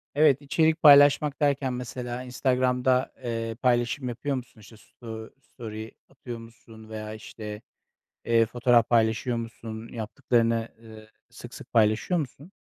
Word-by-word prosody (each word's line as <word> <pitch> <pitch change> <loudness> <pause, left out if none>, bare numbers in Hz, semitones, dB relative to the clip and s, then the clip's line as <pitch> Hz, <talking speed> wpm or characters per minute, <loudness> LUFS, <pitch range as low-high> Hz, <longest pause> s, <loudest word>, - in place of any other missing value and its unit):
Evet, 145 -2 +4
içerik 160 +3 +1
paylaşmak 145 0 +6
derken 140 -3 +1
mesela 125 0 -5
Instagram'da, 125 0 +1
eee, 115 -1 -3
paylaşım 125 +1 +1
yapıyor 130 +4 -3
musun? 125 -3 -8
İşte 110 +1 -15
sto 110 0 -10
story 110 -3 -9 0.2
atıyor 125 -3 -8
musun 115 -1 -14
veya 110 -1 -6
işte, 105 -1 -8 0.6
eee, 115 -1 +4
fotoğraf 120 0 +2
paylaşıyor 115 +1 +2
musun? 115 -1 -7
Yaptıklarını, 115 0 0 0.2
ııı, 110 -1 -13 0.2
sık - - -12
sık - - -12
paylaşıyor 110 +10 +2
musun? 150 +3 -7
120 Hz, 130 wpm, -26 LUFS, 115-130 Hz, 0.6 s, paylaşmak